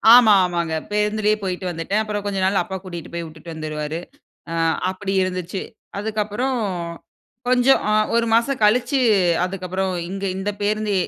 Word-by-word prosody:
ஆமா. 230 -4 +8
ஆமாங்க. 170 -2 -1 0.2
பேருந்துலேயே 210 0 +2
போயிட்டு 185 0 -3
வந்துட்டேன். 175 +6 -1
அப்பறம் 210 -1 -4
கொஞ்ச 200 -1 -1
நாள் 195 +1 +3
அப்பா 190 -3 -6
கூட்டிட்டு 175 -3 -7
போய் 170 0 -3
விட்டுட்டு 160 +1 -10
வந்துருவாரு. 155 0 -4 0.5
அ - - -2 0.4
அப்படி 195 +1 -4
இருந்துச்சு. 185 0 -3 0.4
அதுக்கப்பறம், 220 +4 -1 0.9
கொஞ்சம் 255 +1 +5
அ - - +3 0.2
1 235 0 +3
மாசம் 235 +2 +2
கழிச்சு, 245 +6 +3 0.4
அதுக்கப்பறம் 185 0 -2 0.2
இங்க 195 0 -4
இந்த 190 +2 -2
பேருந்து 210 0 0
200 Hz, 140 wpm, -22 LUFS, 180-215 Hz, 0.9 s, ஆமா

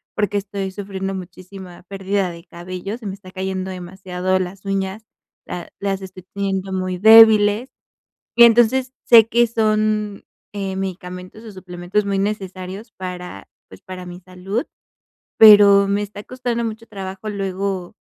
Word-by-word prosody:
porque 205 -1 0
estoy 195 -1 -4
sufriendo 195 -1 -5
muchísima 185 0 -10
pérdida 195 -1 -2
de 170 0 -12
cabello 185 +4 -7
se 235 - -14
me 195 - -4
está 190 -2 -13
cayendo 190 0 -4
demasiado, 185 0 -3
las 185 +2 -6
uñas, 195 +2 -3 0.4
la 175 - -7
las 195 -1 -2
estoy 185 -1 -10
teniendo 195 -1 -2
muy 185 -1 -2
débiles. 220 +2 +7 0.7
Y 235 - +8
entonces, 240 +3 +4
sé 225 -2 +7
que 235 +1 +3
son, 215 -2 0 0.3
eh, 195 -2 -4
medicamentos 185 +2 -7
o 215 - -10
suplementos 185 +2 -3
muy 200 -1 -1
necesarios 195 +1 -4
para, 180 - -8 0.2
pues, 95 - -14
para 185 -1 -9
mi 175 +1 -9
salud, 185 - -5 0.7
pero 205 -2 +8
me 200 +1 0
está 205 0 -8
costando 245 -2 -3
mucho 225 0 -6
trabajo 195 -1 -7
luego, 195 -2 -3
195 Hz, 145 wpm, -20 LUFS, 185-210 Hz, 0.7 s, Y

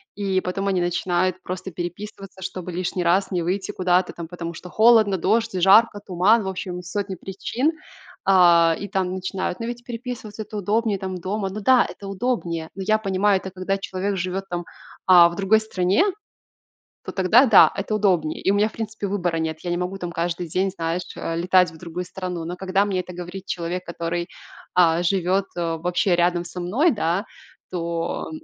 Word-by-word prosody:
И 195 -2 0
потом 195 +2 -2
они 190 -2 +1
начинают 175 +1 0
просто 185 +1 -5
переписываться, 190 +3 -7
чтобы 185 -1 -5
лишний 180 +1 -2
раз 185 +4 +2
не 180 -2 0
выйти 185 +3 -2
куда-то 180 0 +1
там, 170 -2 -8
потому 170 -1 -6
что 180 +2 -10
холодно, 220 -2 +5
дождь, 225 +6 +1
жарко, 205 +3 +6
туман, 205 +3 +3
в - - -5
общем, 185 -1 -4
сотни 195 +2 -3
причин. 235 - -2 0.5
А, 170 -3 +5
и 200 - -5
там 190 -2 -1
начинают, 185 0 -3
но 230 - -3
ведь 240 0 -6
переписываться- 230 -3 -6
это 215 +1 -11
удобнее, 210 +1 0
там, 190 -1 -5
дома. 195 +3 -3
Ну 200 +3 -5
да, 250 +4 +5
это 200 - -9
удобнее, 185 -6 -2
но 195 - -6
я 215 0 +4
понимаю, 200 -1 +2
это 190 - -8
когда 190 +1 -2
человек 195 +1 -3
живет 185 +2 -3
там, 175 -1 -3 0.4
а, 175 -2 +8
в 170 - -8
другой 200 +3 +3
стране, 195 - +1 1.0
то - - -5
тогда, 210 +8 +5
да, 220 -5 +7
это 200 +2 -3
удобнее. 180 -7 +1
И - - +1
у - - +1
меня, 210 +1 +3
в - - -17
принципе, 220 -2 -4
выбора 175 -4 -1
нет. 160 -1 -2
Я 175 - -3
не 175 - 0
могу 180 +2 -3
там 175 -2 -5
каждый 170 +1 -2
день, 185 +4 0
знаешь, 170 -1 -2
э, 165 - -3
летать 180 0 +3
в 160 - -14
другую 175 +2 -5
страну. 180 -2 -5
Но 175 +2 -5
когда 190 +1 +1
мне 195 -3 -1
это 180 - -8
говорит 180 +2 -7
человек, 180 0 -3
который, 170 0 -3 0.5
а, 170 -1 +4
живет, 190 +2 +1
э, 165 -1 -1
вообще 180 +2 +1
рядом 175 0 +2
со 180 - -7
мной, 245 - +2
да, 190 -2 0 0.5
то 170 -2 -3
185 Hz, 190 wpm, -23 LUFS, 175-200 Hz, 1.0 s, а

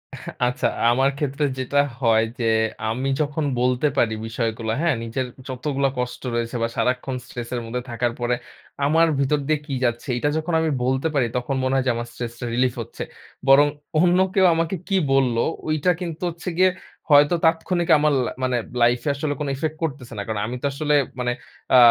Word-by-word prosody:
এহ - - -11 0.2
আচ্ছা। 125 0 -2 0.3
আমার 135 +3 +3
ক্ষেত্রে 145 0 -1
যেটা 130 +2 -2 0.2
হয় 115 -2 +4 0.2
যে, - - -1 0.5
আমি 130 +5 -1
যখন 150 +1 -1 0.2
বলতে 125 +3 +2
পারি 115 -4 +3
বিষয়গুলো 115 -1 -2
হ্যাঁ, 165 -4 +2
নিজের 115 +3 -2 0.2
যতগুলা 135 +1 -1
কষ্ট 125 0 -3
রয়েছে 115 0 -2
বা 115 - +2
সারাক্ষণ 130 +1 0
স্ট্রেস 120 -1 -7
এর 125 - -1
মধ্যে 125 +2 -3
থাকার 120 +1 -1
পরে 120 0 +1 0.5
আমার 165 +3 +4
ভিতর 140 +2 +2
দিয়ে 155 -1 +2
কি 140 - -4
যাচ্ছে। 120 +3 -2
এটা 145 +4 +1
যখন 160 +2 -2
আমি 160 - +1
বলতে 130 +4 +1
পারি, 140 -4 +2
তখন 125 +2 -2
মনে 130 +1 +1
হয় 135 -1 +1
যে - - +4
আমার 120 0 -4
stress 120 -1 -5
relief 120 - -9
টা - - -4
relief 125 0 +1
হচ্ছে। 115 - -6 0.5
বরং 140 +2 +7 0.3
অন্য 180 0 +4 0.2
কেউ 190 -1 +4
আমাকে 165 +3 0
কী 195 - +2 0.2
বলল 130 -3 +3 0.3
ওইটা 155 +3 +2
কিন্তু 170 -1 -5
হচ্ছে 170 +1 -6
গিয়ে 185 0 +5 0.4
হয়তো 145 +3 +6
তাৎক্ষণিক 165 +1 +1
আমার 150 0 +3
লা - - -3
মানে 125 -1 +1 0.2
লাইফ 120 +1 +4
এ - - +3
আসলে 145 +1 -1
কোন 150 - -2
effect 155 +3 -2
করতেছে 135 -6 -4
না। - - -2
কারণ 110 -2 -2
আমি 120 - -4
তো - - -3
আসলে 150 +1 0 0.3
মানে 125 0 0 0.4
আ - - +9
135 Hz, 195 wpm, -23 LUFS, 120-150 Hz, 0.5 s, আ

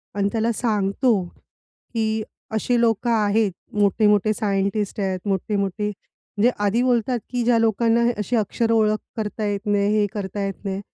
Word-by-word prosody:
आणि 200 0 +1
त्याला 225 +1 +1
सांगतो, 215 -1 +1 0.7
की 220 -1 0 0.3
अशी 240 +3 +1
लोकं 230 0 +1
आहेत, 215 -1 +2 0.2
मोठे-मोठे 210 +1 +3
सायंटिस्ट 200 0 -1
आहेत, 190 -2 -1
मोठे-मोठे. 200 +1 -1 0.5
जे 240 - +6 0.2
आधी 215 +4 +2
बोलतात, 245 -1 +1
की 245 -1 -1
ज्या 235 0 +3
लोकांना 230 +1 +2 0.2
अशी 210 +4 -1
अक्षरं 225 +1 +1
ओळख 215 -1 +3 0.2
करता 215 0 -3
येत 200 +1 -3
नाही, 205 -1 +2
हे 210 - +3
करता 200 -1 -4
येत 195 0 -6
नाही, 195 -1 -2
215 Hz, 150 wpm, -22 LUFS, 200-230 Hz, 0.7 s, जे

